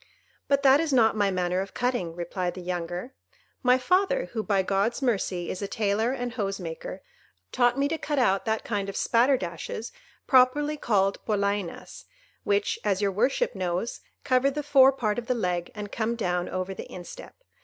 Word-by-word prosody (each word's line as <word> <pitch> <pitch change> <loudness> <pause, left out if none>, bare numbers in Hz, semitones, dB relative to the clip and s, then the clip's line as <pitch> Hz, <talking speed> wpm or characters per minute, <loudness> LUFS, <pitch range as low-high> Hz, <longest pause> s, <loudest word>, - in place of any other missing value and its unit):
"But 280 -1 +2
that 270 +1 +7
is 325 -2 0
not 225 -4 +4
my 205 -2 +2
manner 180 0 0
of 195 - -7
cutting," 245 -10 -1
replied 175 +1 -3
the 185 - -7
younger. 175 +6 -4 0.5
"My 250 0 +4
father, 385 - +1
who, 225 - -1
by 200 -3 +1
God's 200 +5 0
mercy, 190 -7 -1
is 185 - -6
a 200 - -2
tailor 215 +3 0
and 245 -2 -3
hose 195 -4 -2
maker, - - -7 0.5
taught 245 0 +2
me 280 +1 +2
to 320 +2 -3
cut 295 0 -2
out 195 -7 +2
that 220 0 -1
kind 200 -3 -2
of 195 - -6
spatterdashes 230 - 0 0.3
properly 280 +4 +4
called 200 -8 +1
Polainas, 200 -3 -2 0.4
which, 205 0 0
as 200 -3 +1
your 200 -1 +1
worship 250 - +1
knows, 185 +2 -3 0.2
cover 265 0 +3
the 295 +2 -4
fore 275 -2 +6
part 235 -4 -1
of 235 - -9
the 250 - +1
leg 180 -5 -1
and 210 -1 -6
come 230 +1 -1
down 180 -5 -1
over 185 +1 -3
the - - -9
instep. 175 -1 -10
220 Hz, 180 wpm, -26 LUFS, 190-260 Hz, 0.5 s, that